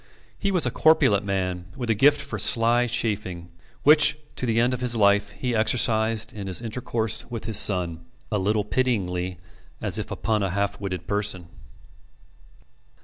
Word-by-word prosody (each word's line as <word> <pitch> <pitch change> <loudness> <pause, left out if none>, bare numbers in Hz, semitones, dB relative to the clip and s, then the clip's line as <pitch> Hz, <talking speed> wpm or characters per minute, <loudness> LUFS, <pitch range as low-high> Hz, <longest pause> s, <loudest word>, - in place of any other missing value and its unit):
He 200 - -1
was 180 -7 +2
a 125 - -1
corpulent 115 -10 +3
man, 90 -3 -3
with 120 -3 -2
a - - +4
gift 145 +7 +3
for 140 - -6
sly 120 +1 +3
chaffing, 95 -7 -3 0.3
which 150 0 +6 0.2
to 130 - -3
the 115 0 +1
end 120 +2 +2
of 125 - -4
his 125 -1 +1
life 100 -1 +3
he 125 0 -4
exercised 110 0 +1
in 100 -2 -7
his 95 - 0
intercourse 115 -1 -3
with 115 -4 -6
his 110 -2 +1
son, 85 -5 +2 0.2
a 105 - 0
little 105 +2 0
pityingly, 95 -7 -1 0.4
as - - +1
if - - -5
upon 110 -1 -1
a 95 - -1
half 100 +2 -2
witted 90 -3 -5
person. 100 -4 -1
110 Hz, 165 wpm, -24 LUFS, 95-120 Hz, 0.4 s, which